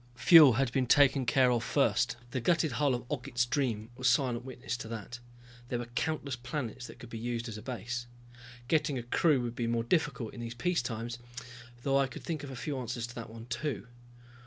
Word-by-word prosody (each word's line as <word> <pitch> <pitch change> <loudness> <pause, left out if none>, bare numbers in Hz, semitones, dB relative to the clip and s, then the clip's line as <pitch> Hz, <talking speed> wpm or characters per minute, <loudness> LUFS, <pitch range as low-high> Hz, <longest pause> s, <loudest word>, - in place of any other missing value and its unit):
Fuel 155 -1 +8
had 130 +1 +1
been 130 -1 +1
taken 135 -1 +5
care 130 0 +4
of 120 -1 +1
first, 120 -3 +2
the 130 -3 -2
gutted 165 +2 +2
hull 145 -3 +2
of 120 - -6
Ogget's 125 -3 0
Dream 120 -5 -1
was 125 0 +2
silent 120 -1 +1
witness 125 -2 -5
to 115 - -7
that. 115 +2 -6 0.5
There 120 - -2
were 120 0 -6
countless 145 0 -1
planets 120 -1 -5
that - - -12
could 120 - -12
be 115 - -5
used 120 0 -3
as 110 - -6
a 105 - -7
base. 120 +1 -4 0.6
Getting 150 -1 +1
a 120 - -4
crew 140 +4 +3
would 120 -1 -4
be 120 -1 -1
more 115 0 0
difficult 125 -5 0
in - - -9
these 120 0 -5
peaceful 165 -3 0
times, 120 +1 -5 0.6
although 135 +3 +1
I 135 - +2
could 130 - -10
think 155 -4 -3
of 140 - -6
a 135 - -7
few 140 +2 -3
answers 120 -1 -3
to 120 - -10
that 115 -2 -7
one, 115 0 -10
too. 125 +4 -3
125 Hz, 215 wpm, -31 LUFS, 120-140 Hz, 0.6 s, Fuel